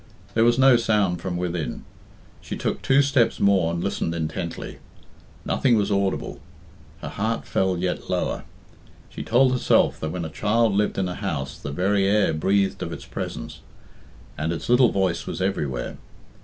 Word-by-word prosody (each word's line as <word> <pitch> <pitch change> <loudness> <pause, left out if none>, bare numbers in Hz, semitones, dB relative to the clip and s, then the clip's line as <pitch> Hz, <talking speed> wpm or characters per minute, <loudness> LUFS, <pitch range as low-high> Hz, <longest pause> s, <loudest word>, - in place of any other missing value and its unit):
There 115 - +3
was 120 +1 +4
no 130 -2 +6
sound 105 -6 +1
from 90 -2 -3
within. 85 -3 -3 0.6
She - - -6
took - - -2
two 135 +1 +4
steps 135 -4 +2
more 95 -4 +3
and 85 0 -3
listened 85 -4 -2
intently. 85 +1 -4 0.7
Nothing 125 -4 +2
was 105 0 0
audible. 100 -1 -1 0.6
Her - - -4
heart 110 +3 -2
fell 95 -1 0
yet 90 +1 -3
lower. - - -1 0.7
She - - -7
told 125 +3 +3
herself 125 -1 +2
that 80 - -3
when 85 +1 -4
a - - -5
child 110 +4 +1
lived 105 +1 0
in 95 - 0
a 90 - -3
house 75 -9 -4
the - - -7
very 95 +5 +1
air 105 -2 +3
breathed 95 +5 +1
of - - -4
its - - -7
presence, - - -6 0.8
and 80 +1 -1
its 85 - -5
little 125 0 +5
voice 95 -4 0
was - - -4
everywhere. 75 -10 -2
95 Hz, 170 wpm, -24 LUFS, 85-115 Hz, 0.8 s, no